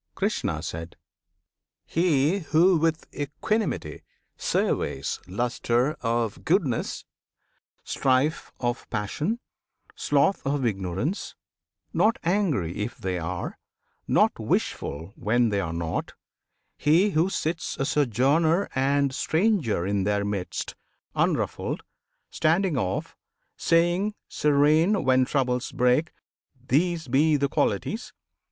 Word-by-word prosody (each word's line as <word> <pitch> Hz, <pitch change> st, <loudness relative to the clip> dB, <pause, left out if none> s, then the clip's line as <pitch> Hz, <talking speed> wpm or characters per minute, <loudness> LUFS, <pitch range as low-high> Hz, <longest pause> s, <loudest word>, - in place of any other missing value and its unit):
Krishna. 80 Hz, 0 st, -1 dB, 1.2 s
He 165 Hz, +1 st, +2 dB
who 170 Hz, +2 st, +4 dB
with 160 Hz, 0 st, 0 dB
equanimity 145 Hz, -, -2 dB, 0.3 s
surveys 70 Hz, -, -1 dB
Lustre 120 Hz, +6 st, 0 dB
of 115 Hz, -2 st, -1 dB
goodness, -, -, 0 dB, 0.8 s
strife 135 Hz, +4 st, +1 dB
of 120 Hz, 0 st, -2 dB
passion, 150 Hz, -, -2 dB, 0.5 s
sloth 145 Hz, +7 st, +1 dB
Of 135 Hz, -1 st, 0 dB
ignorance, 100 Hz, -, -2 dB, 0.6 s
not 220 Hz, +1 st, +3 dB
angry 165 Hz, -, 0 dB
if 105 Hz, +3 st, -3 dB
they 90 Hz, -1 st, -2 dB
are, 85 Hz, +1 st, -4 dB, 0.5 s
Not -, -, +3 dB
wishful 80 Hz, +7 st, -2 dB
when 120 Hz, +2 st, +2 dB
they 100 Hz, -1 st, 0 dB
are 80 Hz, -4 st, -2 dB
not: 85 Hz, -1 st, -3 dB, 0.6 s
he 170 Hz, +8 st, +4 dB
who 165 Hz, +2 st, +2 dB
sits 165 Hz, -2 st, -2 dB
A 135 Hz, -, 0 dB
sojourner 150 Hz, -, +2 dB
and 140 Hz, +1 st, +2 dB
stranger 160 Hz, -, +1 dB
in 100 Hz, 0 st, 0 dB
their 100 Hz, 0 st, 0 dB
midst 100 Hz, -3 st, -3 dB, 0.4 s
Unruffled, -, -, -1 dB, 0.5 s
standing 170 Hz, +2 st, +2 dB
off, 95 Hz, -6 st, -2 dB, 0.4 s
saying 175 Hz, +5 st, +2 dB
serene 150 Hz, +7 st, +3 dB
When 130 Hz, 0 st, +4 dB
troubles 125 Hz, -2 st, 0 dB
break, 125 Hz, +6 st, +2 dB, 0.5 s
"These 160 Hz, +6 st, 0 dB
be 150 Hz, +4 st, +3 dB
the 140 Hz, 0 st, +1 dB
Qualities!" 175 Hz, -, -1 dB
140 Hz, 100 wpm, -26 LUFS, 110-165 Hz, 1.2 s, who